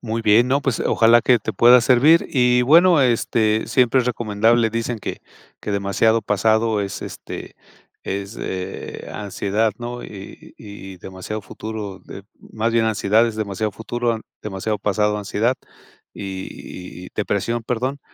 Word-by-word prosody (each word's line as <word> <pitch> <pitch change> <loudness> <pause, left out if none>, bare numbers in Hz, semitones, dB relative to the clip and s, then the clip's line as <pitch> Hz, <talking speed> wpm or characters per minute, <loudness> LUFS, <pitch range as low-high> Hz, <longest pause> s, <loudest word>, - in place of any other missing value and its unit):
Muy 115 -1 -3
bien, 115 +3 +4
no, 140 +2 +2
pues 135 -4 -1
ojalá 115 +1 +4
que 125 -2 +4
te 105 - -4
pueda 120 +1 +6
servir 135 +7 +4
y 125 -2 +3
bueno, 165 +4 +6
este, 115 -3 +1
siempre 125 +2 +3
es 125 - -3
recomendable, 115 0 +2
dicen 115 +1 -3
que - - -6 0.4
que - - -5
demasiado 100 +3 +1
pasado 110 +1 +1
es, 100 -1 -4
este, - - -8 0.5
es, 100 +3 -5
eh, 95 0 -6
ansiedad 105 +2 -1
¿no?, 120 0 -6
y 100 -2 -11
y 100 -2 -10
y - - -15
demasiado 95 +4 -7
futuro 105 -1 -7
de 100 - -10 0.2
más 115 +1 -3
bien 115 -1 +3
ansiedad 110 +1 +2
es 110 - -7
demasiado 105 0 -2
futuro, 115 +1 -2 0.2
demasiado 105 +1 -3
pasado, 105 +1 0
ansiedad 110 +4 0 0.6
y 95 -2 -8
y - - -10
depresión, 110 +3 -1
perdón, 130 +4 -2
110 Hz, 150 wpm, -21 LUFS, 100-120 Hz, 0.6 s, pueda